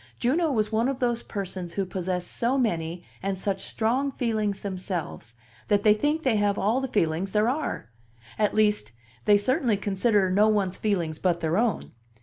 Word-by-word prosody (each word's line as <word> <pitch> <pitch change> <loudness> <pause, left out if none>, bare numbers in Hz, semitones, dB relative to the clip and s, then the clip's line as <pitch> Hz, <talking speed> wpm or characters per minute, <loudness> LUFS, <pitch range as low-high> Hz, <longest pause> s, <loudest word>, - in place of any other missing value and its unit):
Juno 310 - +1
was 215 -4 0
one 225 +3 +2
of 270 -1 -3
those 240 -2 0
persons 185 -4 -5
who 195 - -1
possess 180 -1 -3
so 240 +8 0
many 170 -8 -1 0.2
and 195 0 -2
such 190 0 -2
strong 255 +5 0
feelings 215 -6 -1
themselves 185 - -5 0.3
that 205 -1 +2
they 210 - +6
think 295 +8 0
they 245 -5 +2
have 205 -1 +1
all 225 +6 +1
the 265 - -2
feelings 185 -3 0
there 210 +1 +3
are; 265 - -3 0.5
at 210 -1 +2
least, 210 - +2 0.3
they 205 - +6
certainly 245 - +1
consider 200 -1 +1
no 205 +3 +4
one's 200 -4 +1
feelings 170 -7 -1
but 175 -2 +1
their 160 +1 0
own. 230 +2 0
205 Hz, 175 wpm, -26 LUFS, 185-235 Hz, 0.5 s, they